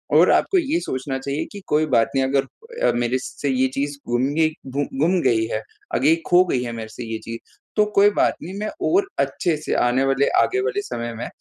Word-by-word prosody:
और -, -, +6 dB
आपको 390 Hz, -, +3 dB
ये 330 Hz, -1 st, +1 dB
सोचना 135 Hz, -, -3 dB
चाहिए 140 Hz, +2 st, -3 dB
कि 205 Hz, -, -9 dB
कोई 150 Hz, +1 st, +2 dB
बात 115 Hz, -1 st, +4 dB
नहीं 135 Hz, -, +3 dB
अगर 275 Hz, -, -1 dB
मेरे 120 Hz, +1 st, +1 dB
से 140 Hz, +2 st, -4 dB
ये 130 Hz, 0 st, +2 dB
चीज़ 145 Hz, +1 st, -2 dB
गुम 120 Hz, +1 st, +1 dB
गई 160 Hz, 0 st, +3 dB, 0.2 s
गु 140 Hz, +2 st, -1 dB, 0.2 s
गुम 175 Hz, +5 st, +3 dB
गई 115 Hz, -5 st, +2 dB
है, 110 Hz, -, -1 dB, 0.3 s
आगे 150 Hz, +5 st, +4 dB
खो 180 Hz, +1 st, +6 dB
गई 130 Hz, -8 st, 0 dB
है 120 Hz, -, -4 dB
मेरे 110 Hz, -1 st, -6 dB
से 120 Hz, +2 st, -8 dB
ये 110 Hz, 0 st, -4 dB
चीज़ 115 Hz, 0 st, -6 dB, 0.4 s
तो 210 Hz, -, +4 dB
कोई 200 Hz, +1 st, +7 dB
बात -, -, +3 dB
नहीं 175 Hz, +4 st, -7 dB
मैं 215 Hz, +1 st, -2 dB, 0.2 s
और 385 Hz, +3 st, +3 dB
अच्छे 170 Hz, -3 st, 0 dB
से 150 Hz, -, -3 dB
आने 125 Hz, +2 st, +2 dB
वाले, 135 Hz, +1 st, +2 dB
आगे 390 Hz, -, +1 dB
वाले 410 Hz, -1 st, -1 dB
समय 120 Hz, -, -5 dB
में 115 Hz, -, -5 dB
140 Hz, 220 wpm, -22 LUFS, 120-185 Hz, 0.4 s, कोई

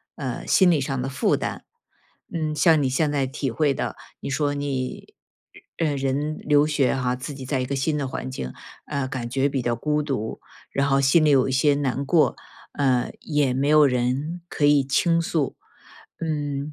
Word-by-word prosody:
呃， -, -, -5 dB
心 185 Hz, -2 st, +5 dB
理 155 Hz, -, +3 dB
上 135 Hz, -1 st, -2 dB
的 135 Hz, -, -3 dB
负 135 Hz, -, +1 dB
担， -, -, -4 dB, 0.7 s
嗯， 155 Hz, -2 st, -2 dB
像 155 Hz, 0 st, +4 dB
你 135 Hz, -, +1 dB
现 145 Hz, +3 st, +1 dB
在 140 Hz, -2 st, 0 dB
体 135 Hz, -1 st, -3 dB
会 145 Hz, +1 st, +1 dB
的， -, -, -4 dB, 0.2 s
你 -, -, -5 dB
说 145 Hz, +1 st, 0 dB
你， 140 Hz, -3 st, -4 dB, 0.6 s
呃， 150 Hz, -4 st, +1 dB
人 140 Hz, +3 st, -1 dB
留 145 Hz, 0 st, +3 dB
学 145 Hz, -4 st, +1 dB
哈， 125 Hz, -1 st, 0 dB
自 130 Hz, +4 st, -6 dB
己 135 Hz, -1 st, -8 dB
在 135 Hz, 0 st, -1 dB
一 125 Hz, -, -1 dB
个 140 Hz, -, -3 dB
新 150 Hz, +3 st, 0 dB
的 140 Hz, -2 st, -2 dB
环 130 Hz, 0 st, -5 dB
境， 65 Hz, -, -5 dB, 0.3 s
呃， 140 Hz, -2 st, -2 dB
感 120 Hz, -3 st, -4 dB
觉 135 Hz, +3 st, +1 dB
比 135 Hz, -2 st, -1 dB
较 120 Hz, -1 st, 0 dB
孤 150 Hz, +3 st, 0 dB
独， 135 Hz, -7 st, -3 dB, 0.3 s
然 140 Hz, +1 st, +1 dB
后 135 Hz, 0 st, +3 dB
心 155 Hz, +4 st, +4 dB
里 150 Hz, -, +4 dB
有 135 Hz, -1 st, +4 dB
一 -, -, -1 dB
些 140 Hz, +2 st, +3 dB
难 140 Hz, -1 st, -1 dB
过， 160 Hz, +1 st, +3 dB, 0.4 s
呃， 130 Hz, -3 st, +1 dB
也 145 Hz, -4 st, 0 dB
没 135 Hz, +2 st, 0 dB
有 150 Hz, -1 st, +6 dB
人 130 Hz, +6 st, 0 dB
可 150 Hz, -, -4 dB
以 145 Hz, -1 st, +5 dB
倾 165 Hz, +5 st, +2 dB
诉， 160 Hz, -4 st, -1 dB, 0.6 s
嗯。 145 Hz, -2 st, -3 dB
140 Hz, 210 characters per minute, -24 LUFS, 130-150 Hz, 0.7 s, 有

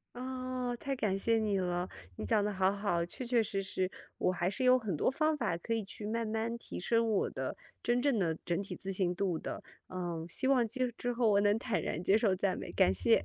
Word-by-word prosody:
哦， 255 Hz, -1 st, -3 dB
太 275 Hz, +2 st, -2 dB
感 210 Hz, -6 st, 0 dB
谢 225 Hz, +3 st, +2 dB
你 210 Hz, -3 st, +1 dB
了， 180 Hz, 0 st, -1 dB, 0.3 s
你 -, -, -4 dB
讲 215 Hz, -3 st, +3 dB
得 210 Hz, -, 0 dB
好 190 Hz, -1 st, +3 dB
好， 200 Hz, -4 st, 0 dB
确 250 Hz, +8 st, -7 dB
确 235 Hz, -1 st, +3 dB
实 195 Hz, -2 st, -2 dB
实， 185 Hz, -1 st, -2 dB, 0.3 s
我 -, -, +2 dB
还 175 Hz, 0 st, 0 dB
是 255 Hz, +6 st, -4 dB
有 255 Hz, 0 st, +6 dB
很 215 Hz, -7 st, -2 dB
多 150 Hz, -, +2 dB
方 310 Hz, +3 st, +2 dB
法， 280 Hz, -, 0 dB
可 175 Hz, +7 st, -4 dB
以 225 Hz, -1 st, +1 dB
去 205 Hz, +1 st, -9 dB
慢 230 Hz, +1 st, -1 dB
慢 225 Hz, +2 st, -1 dB
提 -, -, -7 dB
升 230 Hz, +4 st, +2 dB
我 205 Hz, -, +1 dB
的 -, -, -4 dB, 0.3 s
真 240 Hz, +1 st, +2 dB
正 275 Hz, -5 st, +3 dB
的 165 Hz, -4 st, +1 dB
整 175 Hz, +2 st, 0 dB
体 200 Hz, -, -5 dB
自 195 Hz, 0 st, -5 dB
信 185 Hz, -2 st, +1 dB
度 180 Hz, -3 st, 0 dB
的， -, -, -5 dB, 0.2 s
呃， 175 Hz, -3 st, -4 dB
希 260 Hz, +9 st, -1 dB
望 250 Hz, -4 st, +4 dB
今 250 Hz, +1 st, -1 dB
之 245 Hz, 0 st, -1 dB
后 235 Hz, -2 st, +3 dB
我 200 Hz, -1 st, +5 dB
能 205 Hz, +1 st, +3 dB
坦 225 Hz, -3 st, -1 dB
然 165 Hz, -, -2 dB
接 195 Hz, +4 st, +4 dB
受 200 Hz, -4 st, +2 dB
赞 195 Hz, 0 st, 0 dB
美， -, -, -6 dB
感 90 Hz, -, +4 dB
谢。 90 Hz, -1 st, +3 dB
210 Hz, 260 characters per minute, -33 LUFS, 185-240 Hz, 0.3 s, 有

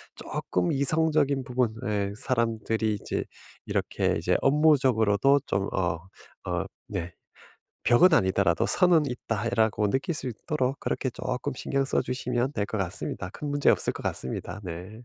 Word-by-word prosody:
쪼끔 90 Hz, -1 st, -2 dB
이성적인 145 Hz, -1 st, +2 dB
부분에 110 Hz, -5 st, -1 dB
사람들이 115 Hz, -2 st, 0 dB
이제 100 Hz, -, -3 dB, 0.4 s
이렇게 -, -, 0 dB
이제 -, -, +1 dB
업무적으로도 135 Hz, -4 st, +4 dB
좀 95 Hz, 0 st, 0 dB
어 90 Hz, -2 st, 0 dB, 0.5 s
어 -, -, 0 dB, 0.2 s
네. 90 Hz, -3 st, -4 dB, 0.7 s
'벽은 160 Hz, +9 st, +6 dB
아니더라도 95 Hz, -, +2 dB
선은 175 Hz, -5 st, +4 dB
있다.'라고 115 Hz, -3 st, 0 dB
느낄 135 Hz, +6 st, 0 dB
수 150 Hz, -, -5 dB
있도록 130 Hz, +3 st, -2 dB
그렇게 130 Hz, -, -1 dB
쪼끔 125 Hz, +1 st, -3 dB
신경 135 Hz, +1 st, -1 dB
써 -, -, +1 dB
주시면 125 Hz, 0 st, -1 dB
될 100 Hz, -7 st, -1 dB
것 110 Hz, -, -3 dB
같습니다. 95 Hz, 0 st, -3 dB
큰 150 Hz, -, -6 dB
문제 145 Hz, 0 st, +3 dB
없을 -, -, +1 dB
것 -, -, -9 dB
같습니다. 65 Hz, +10 st, -4 dB
네. 90 Hz, +2 st, -6 dB
120 Hz, 305 characters per minute, -27 LUFS, 100-140 Hz, 0.7 s, 벽은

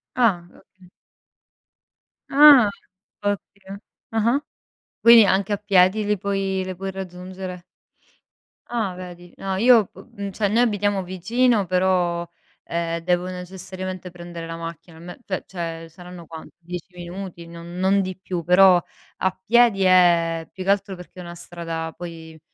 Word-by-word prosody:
Ah 205 Hz, -9 st, +2 dB
oka 185 Hz, -1 st, -21 dB, 1.4 s
Ah 280 Hz, -6 st, +8 dB, 0.5 s
ottimo, 200 Hz, -1 st, -5 dB, 0.4 s
ah-ah. 235 Hz, +6 st, +2 dB, 0.6 s
Quindi 235 Hz, -1 st, +8 dB
anche 195 Hz, +2 st, +1 dB
a -, -, +2 dB
piedi 200 Hz, 0 st, +3 dB
li 210 Hz, -1 st, 0 dB
puoi 195 Hz, -1 st, -1 dB
le 185 Hz, -, -5 dB
puoi 195 Hz, +2 st, -4 dB
raggiungere? 185 Hz, -1 st, -7 dB, 1.0 s
Ah 220 Hz, -6 st, -2 dB
vedi. 175 Hz, -1 st, -10 dB
No, 190 Hz, -1 st, -3 dB
io 230 Hz, -2 st, +5 dB
p -, -, -26 dB, 0.2 s
mhmm, 200 Hz, -1 st, -5 dB
cioè, 205 Hz, +2 st, 0 dB
noi 225 Hz, +4 st, +2 dB
abitiamo 205 Hz, -4 st, +1 dB
vicino 210 Hz, +5 st, +1 dB
però, 180 Hz, -2 st, +1 dB, 0.4 s
ehm, 170 Hz, 0 st, -2 dB
devo 180 Hz, +1 st, 0 dB
necessariamente 185 Hz, 0 st, -7 dB
prendere 175 Hz, -1 st, -9 dB
la 165 Hz, -, -6 dB
macchina, 165 Hz, 0 st, -9 dB
ne 175 Hz, +1 st, -10 dB
pe 185 Hz, -2 st, -3 dB
cioè, 165 Hz, -2 st, -6 dB
saranno 175 Hz, 0 st, -12 dB
quanto, 160 Hz, 0 st, -11 dB
10 180 Hz, +1 st, -8 dB
minuti, 175 Hz, 0 st, -8 dB
non 170 Hz, +1 st, -10 dB
non 195 Hz, +2 st, +3 dB
di 185 Hz, -1 st, -5 dB
più, 180 Hz, -2 st, -5 dB
però 180 Hz, +1 st, +6 dB, 0.4 s
a 190 Hz, 0 st, -1 dB
piedi 230 Hz, -3 st, +4 dB
è 170 Hz, -3 st, +4 dB
più 185 Hz, -, -7 dB
che 195 Hz, -, -3 dB
altro 195 Hz, -1 st, +1 dB
perché 180 Hz, +1 st, -13 dB
è -, -, -6 dB
una 170 Hz, 0 st, -9 dB
strada 165 Hz, -1 st, -6 dB
poi 165 Hz, -2 st, -9 dB
185 Hz, 145 wpm, -22 LUFS, 175-200 Hz, 1.4 s, Ah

